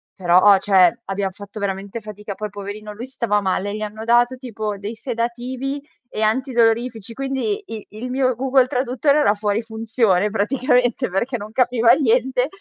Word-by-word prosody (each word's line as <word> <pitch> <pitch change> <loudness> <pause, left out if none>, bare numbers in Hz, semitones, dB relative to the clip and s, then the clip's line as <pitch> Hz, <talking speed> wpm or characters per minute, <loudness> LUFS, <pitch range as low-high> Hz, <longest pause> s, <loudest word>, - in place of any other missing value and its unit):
però 180 -1 +4
ho 200 +1 +7
cioè, 190 -4 +4
abbiam 195 0 -2
fatto 200 +2 -10
veramente 200 +2 -4
fatica, 210 -1 -7
poi 210 +1 -5
poverino 205 +1 -7
lui 225 +4 -7
stava 235 -5 0
male, 200 +1 -1
gli 215 - -6
hanno 215 +1 -5
dato 240 +2 +3
tipo 220 -5 -5
dei 210 +3 -5
sedativi 245 +3 -3 0.3
e 215 - -5
antidolorifici 230 -1 +1
quindi 275 - -2
i 220 -2 -7
il 220 +4 -7
mio 255 0 +1
Google 260 0 +3
traduttore 260 +3 +1
era 205 -9 +4
fuori 205 +1 -1
funzione 220 -3 +1
praticamente 245 +2 +1
perché 235 +8 -1
non 210 0 -8
capiva 240 -1 +3
niente, 255 -1 +2
225 Hz, 160 wpm, -21 LUFS, 205-250 Hz, 0.3 s, ho